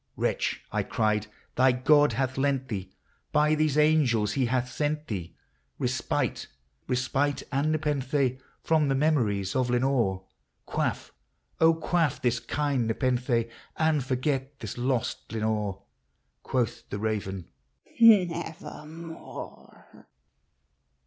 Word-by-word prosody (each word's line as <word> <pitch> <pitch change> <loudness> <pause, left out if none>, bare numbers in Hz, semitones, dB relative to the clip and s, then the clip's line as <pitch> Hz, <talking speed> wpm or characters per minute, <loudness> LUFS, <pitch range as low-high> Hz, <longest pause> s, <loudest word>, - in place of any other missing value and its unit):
" - - -43
Wretch," - - -1
I - - +1
cried, 105 -1 0
" - - -35
thy 130 +1 +6
God 145 +2 +4
hath 130 +2 -1
lent 135 -1 0
thee,— 95 -4 -4 0.4
by 150 0 +3
these 155 -1 +1
angels 140 -9 +3
he 130 -3 +1
hath 125 +1 0
sent 150 +1 -1
thee 90 - -5 0.4
Respite, - - -1 0.2
— 65 0 -44
respite 135 +2 0
and 145 +2 +1
nepenthe 140 -4 0 0.2
from 155 -2 +3
the 135 - +2
memories 115 -10 +1
of 130 -2 +1
Lenore! 120 -7 +1 0.4
Quaff, - - -2 0.5
O, 165 0 +6
quaff 160 -3 0
this 125 -2 +1
kind 135 0 -1
nepenthe, 120 0 +1 0.3
and 155 -3 +2
forget 135 +1 -2
this 110 -3 -6
lost 125 -1 -2
Lenore! 105 -3 -2 0.3
" 65 0 -48
Quoth 125 -5 -2
the 100 - -3
raven, 100 -4 -3 0.3
" - - -27
Nevermore 170 -5 0
130 Hz, 125 wpm, -27 LUFS, 115-150 Hz, 0.5 s, thy